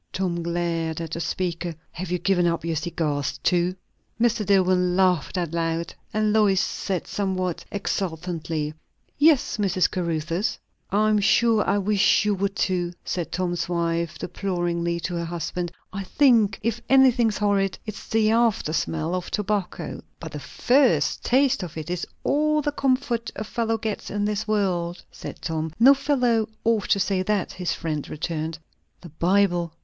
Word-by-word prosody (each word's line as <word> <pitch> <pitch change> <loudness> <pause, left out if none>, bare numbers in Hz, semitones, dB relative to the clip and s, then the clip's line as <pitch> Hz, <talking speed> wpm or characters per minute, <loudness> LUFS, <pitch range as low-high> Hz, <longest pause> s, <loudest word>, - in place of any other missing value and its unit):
Tom 180 -2 -1
glared 170 -1 -1
at 165 -2 -5
the 165 - -3
speaker. 170 0 -2 0.2
"Have 180 +2 -6
you 180 - 0
given 175 0 +2
up 170 -1 -1
your 165 -1 -1
cigars 150 -4 -2
too?" 180 +1 +2 0.4
Mr. 235 -2 +2
Dillwyn 185 -2 +3
laughed 185 -4 +2
out, 170 -1 -1 0.2
and 215 0 +1
Lois 205 -3 +4
said 190 -2 -2
somewhat 185 -3 -2
exultantly, 165 -5 -3 0.5
"Yes, 295 -5 +4
Mr. 190 -3 +2
Caruthers." 170 +2 -1 0.3
"I 210 +2 +2
am 210 -1 +3
sure 220 +1 +4
I 200 - +3
wish 205 +1 +3
you 210 - +2
would 195 +1 -1
too!" 180 -3 0
said 170 -3 -3
Tom's 175 -1 -2
wife 170 -1 -1
deploringly 175 -3 -2
to 180 - -3
her 170 - -2
husband. 175 +1 -3 0.2
"I 195 - -3
think 225 -2 +3
if 230 +1 -1
anything's 250 -5 +5
horrid, 200 -2 +1
it's 215 -2 -7
the 220 -1 +3
after 225 -8 +2
smell 160 +1 -1
of 180 -1 -3
tobacco." 205 -3 -2 0.2
"But 160 -2 -7
the 150 - -6
first 245 - +2
taste 260 -3 +3
of 170 -3 -7
it 160 +2 -5
is 180 -1 -3 0.2
all 305 +1 +2
the 290 - 0
comfort 255 -4 0
a - - -3
fellow 225 +1 -1
gets 220 -1 -4
in 205 0 -1
this 210 +1 -2
world," 180 -5 0
said - - -9
Tom. 160 -1 -2
"No 265 +4 +8
fellow 250 -6 +1
ought 225 -3 +1
to 200 - +3
say 195 -1 +1
that," 200 0 0
his 180 -1 -2
friend 155 -3 -4
returned. 160 0 -3 0.4
"The 175 - -10
Bible!" 175 +1 +1
185 Hz, 160 wpm, -24 LUFS, 170-215 Hz, 0.5 s, No